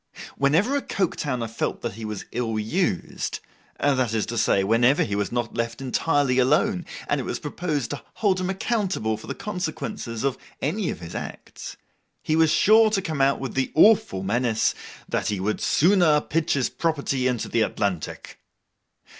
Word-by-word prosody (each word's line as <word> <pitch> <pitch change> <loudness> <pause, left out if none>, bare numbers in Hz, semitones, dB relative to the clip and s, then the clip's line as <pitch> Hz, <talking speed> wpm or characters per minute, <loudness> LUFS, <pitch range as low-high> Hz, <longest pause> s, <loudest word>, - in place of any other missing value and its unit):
Whenever 165 - +2
a 285 - +1
Coketowner 145 - -2
felt 110 -2 -3
he 110 +2 -7
was 105 -2 -5
ill 115 -3 -2
used—that 130 - -2
is 110 - +1
to 120 - -5
say, 100 -3 +2
whenever 120 +7 +3
he 100 - -2
was 100 -1 -1
not 120 -2 -2
left 115 0 -3
entirely 135 0 +1
alone, 175 - +2 0.2
and 145 - 0
it - - -5
was - - -3
proposed 150 -4 -3
to 145 - -5
hold 195 -4 +1
him 185 0 -2
accountable 190 - -1
for 110 - -11
the - - -4
consequences 160 - -4
of 135 -2 -1 0.2
any 185 +6 -1
of - - -5
his 85 0 -8
acts—he 155 - -7
was 160 -1 +4
sure 220 +6 +5
to 210 -2 +1
come 160 -7 -3
out 135 +1 +3
with 135 - -5
the 135 0 -1
awful 200 - +5
menace, 110 +2 +1 0.3
that - - -1
he 105 -2 -1
would 105 +3 -1
'sooner 170 -3 +4
pitch 160 +2 0
his 130 -3 +1
property 140 -5 -1
into 125 -3 -1
the 115 - +1
Atlantic. 100 -6 -2
135 Hz, 165 wpm, -24 LUFS, 115-170 Hz, 0.3 s, sure